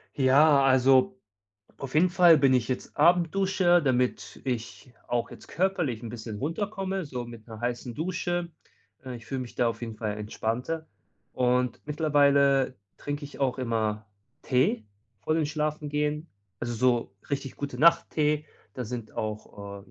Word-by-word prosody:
Ja, 140 Hz, +2 st, +5 dB
also, 135 Hz, +8 st, +4 dB, 0.6 s
auf 135 Hz, -1 st, -7 dB
jeden 165 Hz, +4 st, +5 dB
Fall 175 Hz, -3 st, +6 dB
bin 135 Hz, -2 st, +4 dB
ich 125 Hz, -4 st, +1 dB
jetzt 130 Hz, -, -4 dB
Abendduscher, 175 Hz, +2 st, +3 dB
damit 125 Hz, -4 st, -1 dB
ich 125 Hz, 0 st, -5 dB
auch 120 Hz, -1 st, -1 dB
jetzt -, -, -13 dB
körperlich 175 Hz, -, -1 dB
'n 115 Hz, -, -5 dB
bisschen 110 Hz, -2 st, -7 dB
runterkomme, 190 Hz, -, -3 dB
so 125 Hz, -4 st, -5 dB
mit 115 Hz, -2 st, -11 dB
'ner 110 Hz, -2 st, -10 dB
heißen 120 Hz, 0 st, -3 dB
Dusche, 175 Hz, +2 st, -2 dB, 0.6 s
äh, 130 Hz, -1 st, -6 dB
ich 115 Hz, -1 st, -14 dB
fühle 130 Hz, +2 st, -3 dB
mich 120 Hz, -, -10 dB
da 120 Hz, -, +2 dB
auf 115 Hz, -1 st, -4 dB
jeden 115 Hz, -2 st, -6 dB
Fall 105 Hz, -2 st, -3 dB
entspannter. 115 Hz, +9 st, -3 dB, 0.5 s
Und 125 Hz, -1 st, +1 dB
mittlerweile 140 Hz, -3 st, +3 dB, 0.2 s
trinke 145 Hz, +1 st, -5 dB
ich 145 Hz, -, -10 dB
auch 130 Hz, -1 st, 0 dB
immer 110 Hz, -4 st, -1 dB, 0.4 s
Tee 125 Hz, -4 st, +1 dB, 0.4 s
vor 155 Hz, -, 0 dB
dem 160 Hz, -2 st, +1 dB
Schlafengehen. 150 Hz, 0 st, -2 dB, 0.3 s
Also, 120 Hz, 0 st, -3 dB
so 120 Hz, -3 st, +1 dB, 0.2 s
richtig 140 Hz, -1 st, -3 dB
Gute-Nacht-Tee. 150 Hz, 0 st, +2 dB, 0.3 s
Da 125 Hz, -, -5 dB
sind 115 Hz, -1 st, -6 dB
auch, 100 Hz, -2 st, -6 dB
äh, -, -, -21 dB
135 Hz, 150 wpm, -27 LUFS, 120-155 Hz, 0.6 s, Fall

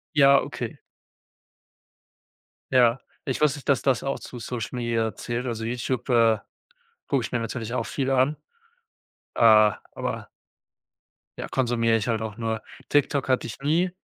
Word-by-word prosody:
Ja, 140 Hz, -1 st, +7 dB
okay. -, -, -5 dB, 2.0 s
Ja, 125 Hz, -1 st, +4 dB, 0.2 s
ich 130 Hz, 0 st, -2 dB
wusste 150 Hz, -1 st, +3 dB
nicht, 140 Hz, -, -13 dB
dass 140 Hz, -, +3 dB
das 135 Hz, -2 st, +1 dB
auch 135 Hz, -, -2 dB
zu 125 Hz, -, -9 dB
Social 115 Hz, -1 st, -4 dB
Media 115 Hz, -2 st, 0 dB
zählt. 120 Hz, +2 st, -3 dB
Also, 115 Hz, -2 st, -3 dB
YouTube, 125 Hz, +2 st, -3 dB
äh, 115 Hz, -3 st, +4 dB, 0.7 s
gucke 135 Hz, -5 st, 0 dB
ich -, -, -4 dB
mir 120 Hz, -, 0 dB
natürlich 115 Hz, 0 st, -4 dB
auch 125 Hz, -, -1 dB
viel 135 Hz, -1 st, -2 dB
an, 135 Hz, +3 st, +3 dB, 1.0 s
äh, -, -, -2 dB
aber 110 Hz, -2 st, +3 dB, 1.1 s
ja, -, -, -5 dB
konsumiere 115 Hz, -3 st, +1 dB
ich 110 Hz, +2 st, -2 dB
halt 110 Hz, -1 st, 0 dB
auch 110 Hz, -1 st, -5 dB
nur. 110 Hz, -2 st, -2 dB, 0.3 s
TikTok 145 Hz, -1 st, +1 dB
hatte 130 Hz, -1 st, +1 dB
ich 110 Hz, -, -7 dB
nie. 165 Hz, +6 st, +2 dB
120 Hz, 150 wpm, -25 LUFS, 115-135 Hz, 2.0 s, Ja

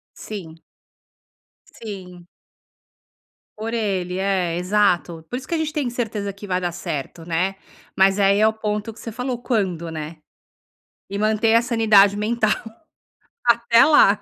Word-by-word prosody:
Sim. 165 Hz, -6 st, -8 dB, 1.1 s
Sim. 180 Hz, -5 st, -10 dB, 1.3 s
Por 225 Hz, +2 st, -4 dB
ele, 190 Hz, -5 st, -1 dB
é, 185 Hz, -3 st, 0 dB
exato. 180 Hz, -4 st, +1 dB
Por 245 Hz, -, -3 dB
isso 260 Hz, -, -9 dB
que 335 Hz, -, -1 dB
a -, -, 0 dB
gente 310 Hz, -1 st, -2 dB
tem 280 Hz, -5 st, -1 dB
certeza 215 Hz, -5 st, -3 dB
que 200 Hz, +1 st, -10 dB
vai 180 Hz, -1 st, 0 dB
dar 175 Hz, -1 st, -2 dB
certo, 160 Hz, 0 st, -6 dB
né. 180 Hz, +3 st, -1 dB, 0.4 s
Mas 195 Hz, +1 st, +4 dB
aí 200 Hz, +1 st, +4 dB
é 215 Hz, -, +5 dB
o 220 Hz, -, +1 dB
ponto 210 Hz, 0 st, -3 dB
que -, -, -16 dB
você 230 Hz, -, -7 dB
falou: 250 Hz, +1 st, -3 dB
"Quando?", 185 Hz, -9 st, -1 dB
né, 155 Hz, 0 st, -6 dB, 0.9 s
e 200 Hz, -, -4 dB
manter 220 Hz, +1 st, +2 dB
a 230 Hz, -, +6 dB
sanidade 215 Hz, -4 st, +4 dB
mental, 215 Hz, +1 st, +1 dB, 0.9 s
até 235 Hz, 0 st, +5 dB
lá. 215 Hz, -10 st, +5 dB
205 Hz, 150 wpm, -22 LUFS, 180-225 Hz, 1.3 s, a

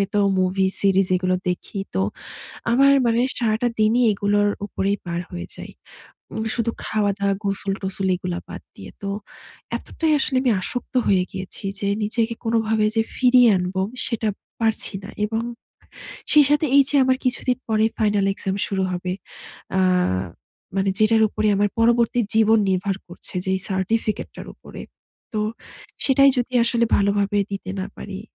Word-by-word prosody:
তো 205 Hz, -, +3 dB, 0.2 s
movie 190 Hz, +1 st, +1 dB
series 195 Hz, -1 st, +3 dB
এগুলো 185 Hz, 0 st, 0 dB
দেখি। 180 Hz, +3 st, -4 dB, 0.2 s
তো, 95 Hz, -, +1 dB, 0.7 s
আমার 275 Hz, +3 st, +5 dB
মানে 230 Hz, +1 st, +2 dB, 0.2 s
সারাটা 230 Hz, 0 st, +1 dB
দিনই 225 Hz, +3 st, +3 dB
এগুলোর 205 Hz, +1 st, +1 dB, 0.2 s
উপরেই 200 Hz, 0 st, -1 dB
পার 170 Hz, 0 st, -2 dB
হয়ে 85 Hz, -1 st, -6 dB
যাই। -, -, -9 dB, 0.6 s
উম 220 Hz, -, -3 dB
শুধু 230 Hz, -1 st, 0 dB
খাওয়া-দাওয়া, 200 Hz, -2 st, 0 dB
গোসল-টোসল 195 Hz, -1 st, -2 dB
এগুলা 180 Hz, -1 st, -4 dB
বাদ -, -, -8 dB
দিয়ে। -, -, -10 dB
তো, 200 Hz, -, -3 dB, 0.7 s
এতটাই 320 Hz, -1 st, -2 dB
আসলে 265 Hz, -, 0 dB
আমি 255 Hz, -, +2 dB
আসক্ত 245 Hz, 0 st, -5 dB
হয়ে 190 Hz, -2 st, +4 dB
গিয়েছি 190 Hz, +1 st, -7 dB, 0.2 s
যে, 200 Hz, -, -1 dB, 0.2 s
নিজেকে 225 Hz, +2 st, -1 dB
কোনভাবে 225 Hz, -1 st, +1 dB
যে 225 Hz, -, +4 dB
ফিরিয়ে 250 Hz, -1 st, +5 dB
আনবো 180 Hz, +1 st, -2 dB, 0.3 s
সেটা 225 Hz, -2 st, -1 dB, 0.3 s
পারছি 220 Hz, -2 st, +1 dB
না 195 Hz, -, -8 dB
এবং 225 Hz, +2 st, -1 dB, 0.9 s
সেই 300 Hz, -1 st, +7 dB
সাথে 295 Hz, +1 st, +3 dB
এই 280 Hz, -, +8 dB
যে -, -, -3 dB
আমার 260 Hz, 0 st, +3 dB
কিছুদিন 250 Hz, 0 st, +1 dB
পরে 220 Hz, 0 st, +2 dB
final 205 Hz, -2 st, +2 dB
exam 195 Hz, -1 st, -3 dB
শুরু 195 Hz, -1 st, -1 dB
হবে। 180 Hz, 0 st, -3 dB, 0.7 s
আ -, -, +4 dB, 1.0 s
মানে 195 Hz, 0 st, +1 dB
যেটার 220 Hz, +1 st, +4 dB
উপরে 215 Hz, 0 st, -1 dB
আমার 205 Hz, +1 st, +2 dB
পরবর্তী 235 Hz, +1 st, +3 dB
জীবন 220 Hz, 0 st, +5 dB
নির্ভর 190 Hz, +1 st, 0 dB
করছে। 175 Hz, -, -7 dB
যেই 190 Hz, 0 st, +1 dB
certificate 210 Hz, +3 st, -1 dB
টার -, -, -8 dB
উপরে। -, -, -11 dB, 0.5 s
তো 215 Hz, -, -1 dB, 0.6 s
সেটাই 275 Hz, 0 st, +5 dB
যদি 245 Hz, +1 st, -2 dB
আসলে 235 Hz, 0 st, +2 dB
ভালোভাবে 200 Hz, 0 st, +1 dB
দিতে 195 Hz, -1 st, -5 dB
না 190 Hz, -, -3 dB
পারি। 195 Hz, -1 st, -7 dB
210 Hz, 150 wpm, -22 LUFS, 195-230 Hz, 1.0 s, এই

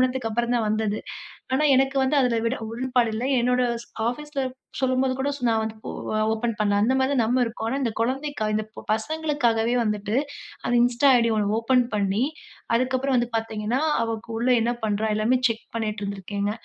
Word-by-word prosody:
திருமணத்துக்கு 255 Hz, -2 st, 0 dB
அப்புறம் 240 Hz, +2 st, 0 dB
தான் 225 Hz, -2 st, 0 dB
வந்தது. 215 Hz, -1 st, 0 dB, 0.6 s
ஆனா, 290 Hz, -, +2 dB
எனக்கு 270 Hz, +1 st, +2 dB
வந்து 265 Hz, +3 st, +1 dB
அதில 235 Hz, -2 st, +1 dB
விட 255 Hz, -, -1 dB
உடன்பாடு 245 Hz, 0 st, +1 dB
இல்ல. 225 Hz, -, -3 dB, 0.2 s
என்னோட 250 Hz, +1 st, +2 dB, 0.2 s
ஸ் -, -, -28 dB, 0.2 s
ஆஃபீஸில 295 Hz, +2 st, -4 dB, 0.4 s
சொல்லும்போது 260 Hz, 0 st, +1 dB
கூட 275 Hz, +2 st, 0 dB, 0.2 s
நான் 225 Hz, -1 st, +2 dB
வந்து 220 Hz, 0 st, -4 dB
ஒ -, -, -3 dB, 0.4 s
ஓப்பன் 230 Hz, +1 st, -1 dB
பண்ணல, 205 Hz, -1 st, +2 dB
அந்த 245 Hz, +4 st, +3 dB
மாதிரி 265 Hz, +2 st, +1 dB
நம்ம 245 Hz, +3 st, +2 dB
இருக்கோம். 225 Hz, -1 st, -4 dB
ஆனா, 265 Hz, -, -1 dB
இந்த 235 Hz, -, 0 dB
குழந்தைக்காக 255 Hz, -2 st, -1 dB
இந்த 215 Hz, -, 0 dB, 0.3 s
பசங்களுக்காகவே 240 Hz, -2 st, 0 dB
வந்துட்டு 210 Hz, 0 st, -1 dB, 0.5 s
அந்த -, -, 0 dB
Insta 245 Hz, +3 st, +3 dB
ஐடி 230 Hz, -1 st, +2 dB
ஒண்ணு 210 Hz, 0 st, +1 dB
ஓப்பன் 250 Hz, +2 st, +3 dB
பண்ணி 200 Hz, +1 st, 0 dB, 0.5 s
அதுக்கப்புறம் 260 Hz, +2 st, +1 dB
வந்து 240 Hz, -1 st, +1 dB
பார்த்தீங்கன்னா, 225 Hz, +2 st, -1 dB, 0.2 s
அவ 230 Hz, 0 st, -1 dB, 0.2 s
உள்ள 240 Hz, +3 st, 0 dB
என்ன 235 Hz, +2 st, +1 dB
பண்றா 215 Hz, 0 st, 0 dB
எல்லாமே 220 Hz, +4 st, +2 dB
செக் 230 Hz, -1 st, -4 dB
பண்ணீட்டு 215 Hz, -2 st, -2 dB
இருந்திருக்கேங்க. 200 Hz, +1 st, -3 dB
230 Hz, 175 wpm, -24 LUFS, 220-255 Hz, 0.6 s, அந்த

